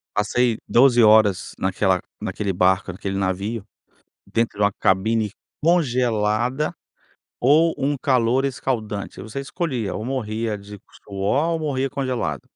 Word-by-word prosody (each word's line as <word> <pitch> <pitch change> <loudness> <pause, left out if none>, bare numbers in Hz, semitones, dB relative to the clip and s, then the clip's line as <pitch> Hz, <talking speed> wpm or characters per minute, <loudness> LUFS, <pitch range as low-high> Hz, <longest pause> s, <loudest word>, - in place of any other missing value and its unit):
Passei 115 +2 +1
12 120 -1 +5
horas 105 -3 +4
naquela - - +1 0.2
naquele 100 -2 -3
barco, 90 +1 +2
naquele 95 +2 -4
navio, 100 +3 -2 0.6
dentro 115 -3 -1
de 105 - +3
uma 100 - +2
cabine 105 +4 +1 0.3
congelada, 125 -4 +1 0.7
ou 155 +6 +4
um 140 +2 0
calor 130 0 +2
escaldante, 110 -8 -3
aí - - -6
você 110 +5 -5
escolhia, 135 - -3
ou 110 - -4
morria 115 -4 -2
de 100 0 -11 0.2
suor, 105 +11 0
ou 165 - -1
morria 135 -3 -1
congelado. 130 -2 -2
115 Hz, 130 wpm, -22 LUFS, 105-135 Hz, 0.7 s, 12